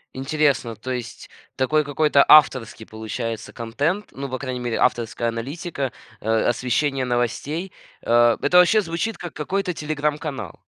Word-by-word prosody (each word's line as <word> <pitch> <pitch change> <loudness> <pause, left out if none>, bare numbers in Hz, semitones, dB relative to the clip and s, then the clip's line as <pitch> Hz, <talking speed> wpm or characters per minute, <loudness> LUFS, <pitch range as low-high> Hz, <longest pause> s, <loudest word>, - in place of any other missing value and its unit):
Интересно, 135 -4 0
то 130 +4 -6
есть 125 -2 -6 0.3
такой 150 +4 +2
какой-то 145 0 +3
авторский 130 -7 +5
получается 110 +1 -5
контент, 145 - -2
ну, 135 0 -6
по 130 -1 -4
крайней 130 -2 -4
мере 120 -2 -2
авторская 115 0 0
аналитика, 135 +4 -4 0.3
э, 110 - -4 0.2
освещение 130 +3 0
новостей. 125 +9 -2 0.3
Э, 120 0 +4
это 160 +5 +3
вообще 180 +5 +6
звучит 180 +6 -3
как 175 - -7
какой-то 185 +4 -2
"Телеграм"-канал. 150 -1 -3
135 Hz, 135 wpm, -22 LUFS, 120-155 Hz, 0.3 s, вообще